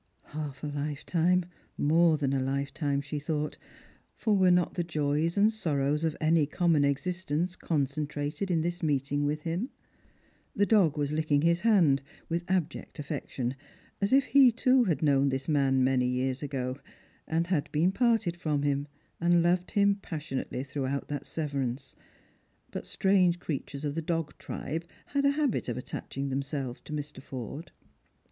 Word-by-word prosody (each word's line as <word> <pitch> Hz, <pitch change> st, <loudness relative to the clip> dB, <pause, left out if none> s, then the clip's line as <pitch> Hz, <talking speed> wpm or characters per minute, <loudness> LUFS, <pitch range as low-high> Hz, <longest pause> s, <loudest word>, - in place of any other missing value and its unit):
Half 150 Hz, -3 st, -5 dB
a 150 Hz, -, -2 dB
hfetime, 160 Hz, +5 st, 0 dB, 0.3 s
more 160 Hz, +2 st, +4 dB
than 140 Hz, -2 st, 0 dB
a 135 Hz, -, +1 dB
lifetime, 140 Hz, +2 st, -1 dB
she 145 Hz, +1 st, -4 dB
thought; 150 Hz, 0 st, -3 dB, 0.6 s
for 215 Hz, -2 st, +1 dB
were 190 Hz, -2 st, +5 dB
not 180 Hz, -1 st, +3 dB
the 175 Hz, -, -1 dB
joys 155 Hz, +1 st, 0 dB
and 210 Hz, +2 st, +4 dB
sorrows 150 Hz, -6 st, 0 dB
of 160 Hz, -2 st, 0 dB
any 155 Hz, -1 st, +3 dB
common 165 Hz, -2 st, +2 dB
existence 175 Hz, +4 st, -1 dB
concentrated 150 Hz, +3 st, -2 dB
in 165 Hz, -3 st, +2 dB
this 175 Hz, +2 st, -2 dB
meeting 145 Hz, -2 st, 0 dB
with 150 Hz, +1 st, -1 dB
him? 175 Hz, +10 st, -2 dB, 0.9 s
The 205 Hz, -, +3 dB
dog 190 Hz, -9 st, +4 dB
was 145 Hz, -1 st, 0 dB
licking 150 Hz, -1 st, +1 dB
his 170 Hz, +1 st, +3 dB
hand, 175 Hz, -, +4 dB, 0.3 s
with 170 Hz, +2 st, -2 dB
abject 180 Hz, -4 st, -2 dB
affection, 130 Hz, -3 st, -3 dB, 0.5 s
as 200 Hz, -, +1 dB
if 270 Hz, +1 st, +6 dB
he 270 Hz, -2 st, +6 dB
too 255 Hz, +1 st, +3 dB
had 165 Hz, -6 st, 0 dB
known 140 Hz, -2 st, +4 dB
this 135 Hz, 0 st, -3 dB
man 135 Hz, -3 st, +3 dB, 0.2 s
years 125 Hz, +1 st, 0 dB
ago, 130 Hz, -2 st, -3 dB, 0.5 s
and 165 Hz, +1 st, 0 dB, 0.2 s
been 165 Hz, +5 st, +3 dB
parted 225 Hz, -5 st, +2 dB
from 150 Hz, -4 st, -1 dB
him, 145 Hz, 0 st, 0 dB, 0.3 s
and 170 Hz, 0 st, +4 dB
loved 180 Hz, +1 st, +2 dB
him 200 Hz, -1 st, +4 dB
passionately 145 Hz, -6 st, -4 dB
throughout 140 Hz, 0 st, -3 dB
that 145 Hz, -2 st, -4 dB
severance; 135 Hz, -4 st, -3 dB, 0.8 s
but -, -, -6 dB
strange 185 Hz, -3 st, +3 dB
creatures 145 Hz, -3 st, -5 dB
of 145 Hz, -, -1 dB
the 165 Hz, -, -2 dB
dog 165 Hz, -1 st, -2 dB
tribe 160 Hz, +4 st, -4 dB, 0.2 s
had 280 Hz, 0 st, 0 dB
a 280 Hz, +1 st, +1 dB
habit 285 Hz, -, 0 dB
of 120 Hz, -, -2 dB
attaching 135 Hz, +2 st, -5 dB
themselves 135 Hz, -2 st, -3 dB
to -, -, -12 dB
Mr. 145 Hz, -3 st, -5 dB
Forde. 135 Hz, +5 st, -7 dB
150 Hz, 155 wpm, -29 LUFS, 140-175 Hz, 0.9 s, if